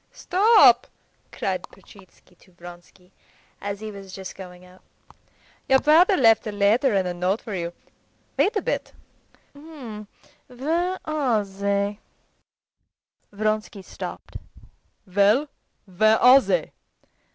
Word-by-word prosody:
"Stop!" 365 - +4 0.4
cried - - -3
Petritsky 195 -2 -20
to 185 - -23
Vronsky 175 +1 -15 0.5
as 200 0 -5
he 215 0 -6
was 195 -2 -11
just 190 -1 -8
going 180 -1 -12
out. 180 +1 -19 0.9
"Your 265 - +6
brother 335 +7 +4
left 225 -2 +4
a - - -3
letter 210 +4 +2
and 190 -2 0
a 180 - -3
note 180 +4 -1
for 220 - -8
you. 170 -2 -4 0.6
Wait 430 - +1
a 410 - -1
bit; - - -3 0.6
where 285 - -6
are 275 -9 0
they?" 200 +1 -2 1.3
Vronsky 215 -1 -3
stopped. - - -9 0.7
"Well, 205 +9 +2 0.4
where 215 +3 +2
are 255 +4 +7
they?" - - -1
215 Hz, 115 wpm, -23 LUFS, 195-270 Hz, 1.3 s, are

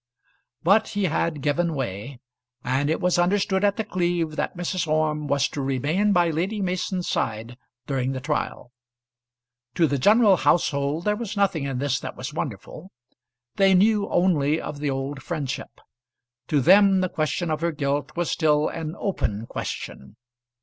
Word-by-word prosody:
But 200 +6 +4
he 205 0 -2
had 165 -3 -1
given 165 +2 0
way, 120 0 -5 0.4
and 135 +3 0
it 160 - 0
was 180 -1 +1
understood 190 +2 +1
at 200 -1 +2
The 220 - 0
Cleeve 175 -5 -1
that 175 - -3
Mrs. 175 -1 -2
Orme 155 -1 0
was 140 0 +2
to 145 - -4
remain 145 +10 +1
by 175 -3 +3
Lady 185 +7 -2
Mason's 185 -1 -2
side 110 +2 -2 0.3
during 130 -2 -1
the 130 - -3
trial. 140 -3 -3 1.0
To 170 - +4
the 140 -2 0
general 210 - +5
household 145 -1 +1
there 210 0 +2
was 215 -2 -5
nothing 185 -8 +1
in 135 -2 -3
this 135 -1 0
that - - -7
was 130 +3 -6
wonderful. 155 - -6 0.7
They 195 -1 +5
knew 205 +2 +3
only 160 -4 +2
of 145 - -6
the 145 -1 -1
old 135 +1 -3
friendship. 140 -3 -5 0.7
To 145 -2 +2
them 195 +4 +6
the 185 - +1
question 160 +2 -2
of 155 0 -2
her 170 0 +1
guilt 145 -1 -2
was 175 -1 -1
still 150 -2 +2
an 160 0 -5
open 115 - -2
question. 65 -10 -6
155 Hz, 165 wpm, -24 LUFS, 140-185 Hz, 1.0 s, them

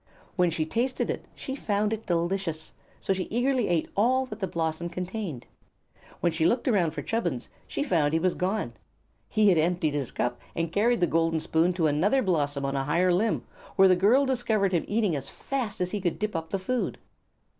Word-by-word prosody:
When 180 -3 +3
she 160 -1 -1
tasted 245 +9 -1
it - - -5
she 265 - -5
found 210 -4 0
it 225 0 -6
delicious; 170 -2 -1 0.3
so 195 - 0
she 185 -1 -2
eagerly 245 +1 +1
ate 170 -3 +1
all 255 +6 +3
that 215 -4 -8
the 190 - -1
blossom 165 0 -2
contained. 180 - -5 0.8
When 175 - +2
she 160 0 -1
looked 235 +10 +2
around 180 -9 +2
for 145 - -4
Chubbins 170 - -2 0.2
she - - -2
found 160 - +2
he 160 - +2
was 180 +1 +2
gone. 185 - -1 0.6
He 215 -1 +4
had 175 -4 +4
emptied 165 -1 +1
his 140 -4 -1
cup 120 0 -2
and 165 -1 -1
carried 230 +5 +2
the - - +6
golden 165 0 +1
spoon 160 +3 +2
to 170 -2 0
another 180 - +2
blossom 145 -7 0
on 135 0 -1
a 135 0 -1
higher 175 +5 +3
limb, 215 +6 +1 0.3
where 195 - +7
the 185 - +5
girl 225 +10 +4
discovered 230 -7 +1
him 170 - +1
eating 210 -6 +1
as 140 -2 -5
fast 255 -7 -4
as 180 0 -1
he 205 - -2
could 175 -3 -1
dip 215 -2 -2
up 165 0 -3
the 195 - -1
food. 245 +6 -2
180 Hz, 205 wpm, -27 LUFS, 160-215 Hz, 0.8 s, where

